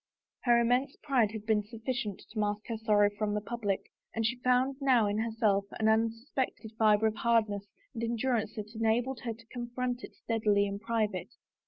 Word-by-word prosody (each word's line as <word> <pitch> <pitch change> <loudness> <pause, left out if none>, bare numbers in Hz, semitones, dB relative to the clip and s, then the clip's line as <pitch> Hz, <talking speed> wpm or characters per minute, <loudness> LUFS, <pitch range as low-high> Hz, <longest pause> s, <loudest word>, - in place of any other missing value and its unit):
Her 240 -1 +6
immense 250 +4 +2
pride 250 -7 +2
had 220 -1 -7
been 215 -1 +3
suflBcient 220 -1 -4
to 215 - -4
mask 210 0 -1
her 230 - -2
sorrow 205 -2 +4
from 210 -1 0
the - - +1
public, 210 -2 -3 0.2
and 225 0 0
she 245 +3 0
found 255 +2 +2
now 255 -5 +4
in 205 +1 0
herself 220 -3 +1
an 220 - +2
unsuspected 225 +1 0
fiber 215 -1 +5
of 220 0 +1
hardness 215 -4 +1 0.3
and 230 - -5
endurance 230 -2 0
that 215 0 -6
enabled 230 +3 +1
her 230 -1 -3
to 230 +1 -18
confront 245 0 -3
it - - -9
steadily 210 -3 +1
in 200 0 -4
private. 215 -4 -1
225 Hz, 180 wpm, -31 LUFS, 210-240 Hz, 0.3 s, Her